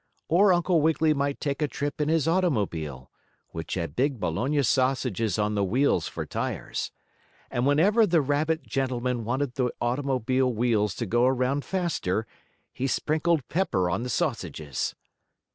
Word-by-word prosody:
Or 190 +4 +5
Uncle 175 -1 +3
Wiggily 160 0 +3
might 140 -1 -1
take 140 0 -2
a 150 - +2
trip 145 +2 -3
in 150 - +1
his 160 -1 +2
automobile, 100 - -1 0.4
which 80 -1 -5
had 85 -3 -4
big 135 -1 0
bologna 130 - 0
sausages 130 -5 +1
on 105 0 0
the 100 -1 +1
wheels 125 +9 +2
for - - -5
tires. - - -3 0.6
And 120 +2 0
whenever 200 +10 +4
the 170 -3 +3
rabbit 155 +3 0
gentleman 125 -3 -1
wanted 130 +2 -1
the 125 -1 0
automobile 130 0 0
wheels 110 -3 +1
to 120 - -3
go 120 +4 +2
around 130 +2 +1
faster 160 - -1 0.5
he 130 - -2
sprinkled 155 +1 0
pepper 145 - 0
on 95 - -1
the 125 - -4
sausages. 90 - -2
130 Hz, 150 wpm, -26 LUFS, 115-155 Hz, 0.6 s, Or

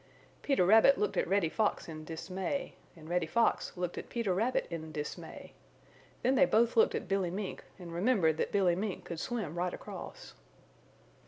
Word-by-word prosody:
Peter 275 -11 +2
Rabbit 225 +8 +6
looked 425 - 0
at - - +1
Reddy 195 -3 +2
Fox 215 +6 0
in 155 -1 -7
dismay, 185 - -4 0.2
and 155 -1 -12
Reddy 175 -1 0
Fox 230 -1 +1
looked 175 -1 -3
at - - -10
Peter 230 -6 -1
Rabbit 225 +7 +1
in 160 -1 -5
dismay. 150 -1 -7 0.7
Then 255 - +3
they 270 0 +6
both 230 +1 +3
looked 225 - +4
at - - -4
Billy 195 -2 0
Mink 190 +2 -5
and 175 -3 -9
remembered 175 -4 +2
that - - -1
Billy 190 -4 +3
Mink 200 +1 -4
could 170 - -6
swim 215 -7 -3
right 175 +1 -1
across. - - -9
190 Hz, 175 wpm, -32 LUFS, 170-225 Hz, 0.7 s, Rabbit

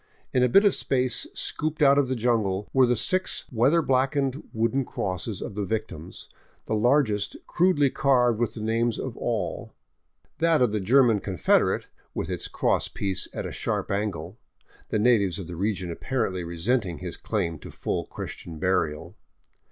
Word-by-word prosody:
In 125 - +3
a 125 - +4
bit 195 - +6
of 200 - +5
space 130 -2 0
scolloped 155 0 -1
out 140 0 +6
of 140 - +2
the 130 - -1
jungle 110 -5 0
were 130 -2 +5
the 125 - +2
six 185 +9 0
weather 135 +8 +3
blackened 135 +1 +1
wooden 115 +5 0
crosses 95 -2 -4
of - - -6
the 105 +1 -2
victims, 100 -5 -5 0.4
the - - -2
largest 110 -2 +2
crudely 170 -6 +2
carved 125 -5 +3
with 120 -3 -1
the 110 - -6
names 115 +1 +1
of - - -5
all, - - -3 0.6
that 165 -1 +3
of 125 -4 +3
the 105 - 0
German 115 +2 +4
con 95 -2 -5
federate - - +2 0.3
with - - -3
its - - -2
cross - - 0
piece 95 -2 -1
at - - -5
a - - -4
sharp - - -2
angle, 100 -2 -3 0.5
the - - 0
natives 105 -5 +3
of 100 - -6
the 85 +1 -7
region 95 -1 -2
apparently 95 -3 -2
resenting 85 +2 -1
his 90 -3 -5
claim 85 -8 -2
to - - -10
full - - -3
Christian 80 -2 -7
burial. 85 -1 -1
115 Hz, 170 wpm, -26 LUFS, 95-130 Hz, 0.6 s, bit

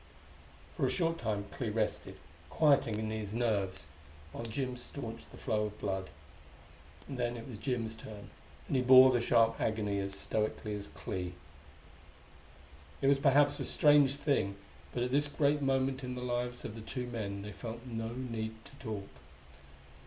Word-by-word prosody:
For - - +2
a - - +1
short 165 -2 +1
time 105 -3 -1
Clee 120 -4 -3
rested, 105 0 -2 0.3
quieting 140 -7 +3 0.2
his 110 -2 -4
nerves, 100 -6 0 0.5
while 115 - -6
Jim 125 +2 -2
staunched 120 -2 -6
the - - -13
flow 110 -4 0
of 105 0 -10
blood. 95 -3 -2 1.0
And 135 -2 -6
then 120 0 0
it 115 - -8
was 115 -5 -8
Jim's 115 -4 -1
turn; 105 -2 -10 0.3
and - - -2
he 130 - +4
bore 130 +1 +9
the 120 -2 +2
sharp 115 -1 +3
agony 105 -2 0
as 100 0 -3
stoically 110 0 -1
as 100 -1 -5
Clee.... 90 +4 -5 1.7
It - - -2
was 140 -1 +4
perhaps 145 +1 +4
a - - -1
strange 145 -2 +5
thing; 140 -9 0 0.4
but 120 - -1
at 125 - -1
this 145 +2 +3
great 145 0 +2
moment 135 -1 +1
in 125 0 -4
the 125 - -5
lives 125 0 -2
of 105 - -5
the 115 - -8
two 125 +3 -4
men 100 -5 -4
they 105 - -6
felt 115 +3 -7
no 115 -2 -4
need 115 -3 -4
to - - -14
talk. 105 -4 -4
115 Hz, 165 wpm, -33 LUFS, 105-130 Hz, 1.7 s, bore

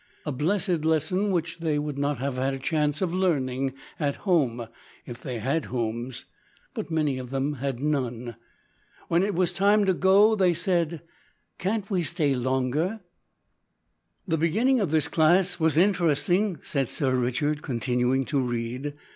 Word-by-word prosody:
A 150 - -2
blessed 175 +4 0
lesson 160 +6 +1
which 170 -2 -2
they 160 -3 0
would 145 -1 -3
not 145 0 0
have 135 +1 -3
had 135 +1 0
a - - -5
chance 150 +3 0
of 175 -2 -1
learning 135 -8 0 0.3
at 145 -3 0
home 130 - 0 0.4
if 120 -1 -9
they 125 -3 -4
had 140 +8 -1
homes; 120 +1 -4 0.5
but - - -5
many 150 -5 0
of 125 -1 -7
them 135 +2 -1
had 135 -3 -2
none. 125 -5 -2 0.7
When 170 +1 +3
it 200 0 0
was 180 -1 +1
time 205 +2 +3
to 190 - +3
go 195 +4 +5
they 185 -5 +3
said 170 -2 0 0.6
`Can't 205 +2 -1
we 185 -2 +1
stay 160 -4 +1
longer?' 130 - -1 1.3
"The 165 -3 0
beginning 225 - +2
of 195 -7 0
this 155 -1 +2
class 175 +4 +3
was 160 -1 +2
interesting," 175 +1 +2
said 135 -4 -1
Sir 130 -4 +1
Richard, 130 +5 0
continuing 125 0 0
to 140 - 0
read. 125 +3 -3
150 Hz, 155 wpm, -26 LUFS, 130-180 Hz, 1.3 s, go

